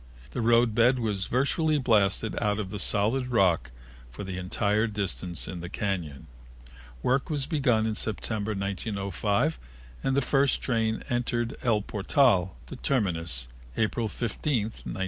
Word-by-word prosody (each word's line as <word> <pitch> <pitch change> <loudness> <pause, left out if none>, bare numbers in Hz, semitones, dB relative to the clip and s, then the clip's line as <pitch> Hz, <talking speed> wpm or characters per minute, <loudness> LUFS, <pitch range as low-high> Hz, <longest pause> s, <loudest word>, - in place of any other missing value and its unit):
The - - -3
roadbed 120 +1 +4
was 105 -5 -2
virtually 150 +5 +1
blasted 110 -4 +2
out 105 -2 +1
of 100 -3 -4
the 105 - -4
solid 110 +8 +2
rock 95 - +2 0.4
for 65 +12 -8
the 95 -1 -5
entire 105 +4 0
distance 95 -4 -2
in 90 - -5
the 85 0 -6
cañon. 90 -8 -3 0.8
Work 135 +2 +1
was 145 -4 0
begun 125 -9 +2
in 110 - 0
September, 110 0 -1
1905, 100 - -1 0.4
and 135 0 +1
the - - +4
first 140 0 +3
train 115 -2 0
entered 120 -1 -1
El 110 -4 +1
Portal, 95 - +2
the - - -9
terminus, 85 - 0 0.3
April 110 +1 0
15, 120 +2 -1
1907. 110 -3 -7
110 Hz, 140 wpm, -27 LUFS, 95-120 Hz, 0.8 s, roadbed